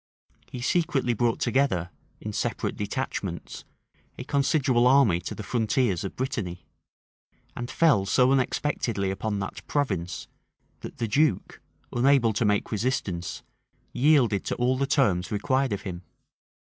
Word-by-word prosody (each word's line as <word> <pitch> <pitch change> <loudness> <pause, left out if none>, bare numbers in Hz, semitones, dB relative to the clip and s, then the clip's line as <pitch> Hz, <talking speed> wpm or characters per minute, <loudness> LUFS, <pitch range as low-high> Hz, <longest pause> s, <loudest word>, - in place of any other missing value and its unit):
He 125 - -6
secretly 135 -3 +1
brought 115 0 0
together, 95 -11 +1 0.3
in - - -6
separate - - -2
detachments, 100 -4 -4 0.5
a - - -5
considerable 135 -3 +2
army 125 -10 +5
to - - -6
the 110 - -7
frontiers 110 -5 0
of 95 - -5
Brittany; 110 - -4 0.9
and 120 +1 -5
fell 125 -13 +3
so 125 +5 +4
unexpectedly 125 -6 0
upon 100 +2 -2
that 95 - -5
province, 95 - -2 0.5
that - - -9
the 115 - -1
duke, 135 -3 0 0.3
unable 125 -2 +3
to 105 +3 0
make 105 -1 +1
resistance, 105 -6 -2 0.5
yielded 125 -7 +3
to - - -2
all 125 +1 +1
the 135 +1 -1
terms 100 - +1
required 130 +5 0
of 100 -1 -3
him. 90 -3 -6
120 Hz, 135 wpm, -26 LUFS, 100-135 Hz, 0.9 s, army